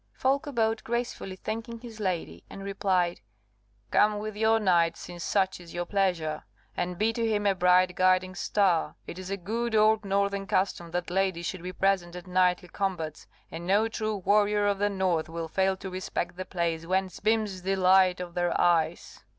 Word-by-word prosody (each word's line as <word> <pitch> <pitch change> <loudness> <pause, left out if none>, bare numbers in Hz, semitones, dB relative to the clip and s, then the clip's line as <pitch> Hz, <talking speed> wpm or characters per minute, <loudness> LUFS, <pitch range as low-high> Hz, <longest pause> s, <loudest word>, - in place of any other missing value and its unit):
Folko 280 +3 0
bowed, 225 -3 0
gracefully 235 -5 -3
thanking 225 +4 -5
his 225 -2 -11
lady, 185 -5 -3
and 195 - -9
replied, 190 - 0 0.7
"Come 210 0 +4
with 215 0 -5
your 220 +1 +3
knight, 175 -5 +2
since 175 -1 -8
such 190 -2 +1
is 175 -1 -12
your 175 0 -2
pleasure, 175 -6 0 0.3
and 180 0 -2
be 220 +3 +1
to 230 - -2
him 210 -2 0
a 200 - +4
bright 180 0 +4
guiding 185 0 +2
star. 180 -4 +1
It 175 - -8
is 185 0 -7
a 195 - -2
good 225 +5 -2
old 215 0 +4
northern 200 0 0
custom 185 -3 0
that 175 +1 -3
ladies 185 -2 0
should 185 0 -4
be 180 +1 -5
present 185 -2 0
at 180 - -8
knightly 180 -1 +1
combats, 170 -5 -3 0.2
and 170 +1 -7
no 205 +4 +3
true 220 -1 -2
warrior 205 +2 +2
of 200 -1 +1
the 205 0 +2
north 185 -5 0
will 165 0 -4
fail 190 +3 +1
to 190 -1 -7
respect 185 -1 -3
the 185 +1 -5
place 170 -3 -2
whence 190 0 -1
beams 215 -3 0
the 195 +2 0
light 185 -1 +4
of 180 -1 -6
their 175 0 0
eyes. 170 -2 +1
190 Hz, 185 wpm, -28 LUFS, 180-210 Hz, 0.7 s, Come